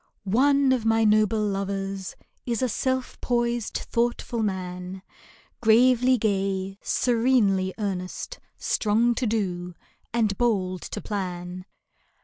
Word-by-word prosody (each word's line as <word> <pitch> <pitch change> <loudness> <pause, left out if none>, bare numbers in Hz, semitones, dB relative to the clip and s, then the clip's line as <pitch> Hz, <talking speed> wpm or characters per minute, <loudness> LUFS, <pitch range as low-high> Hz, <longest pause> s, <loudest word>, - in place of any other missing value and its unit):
One 270 +7 +3
of 250 -4 0
my 225 0 +3
noble 215 0 +3
lovers 195 -1 -3 0.3
Is 235 -1 -1
a - - +3
self 260 +2 -2
poised, 240 -2 0
thoughtful 235 0 0
man, 185 -2 -4 0.6
Gravely 250 +3 +5
gay, 195 -2 -1
serenely 225 -6 +2
earnest, 195 - -4 0.2
Strong 225 +3 +2
to 240 +1 -1
do, 180 -5 -2 0.4
and 220 -4 +1
bold 190 -6 +1
to - - -6
plan. 180 -2 -5
215 Hz, 110 wpm, -25 LUFS, 190-240 Hz, 0.6 s, Gravely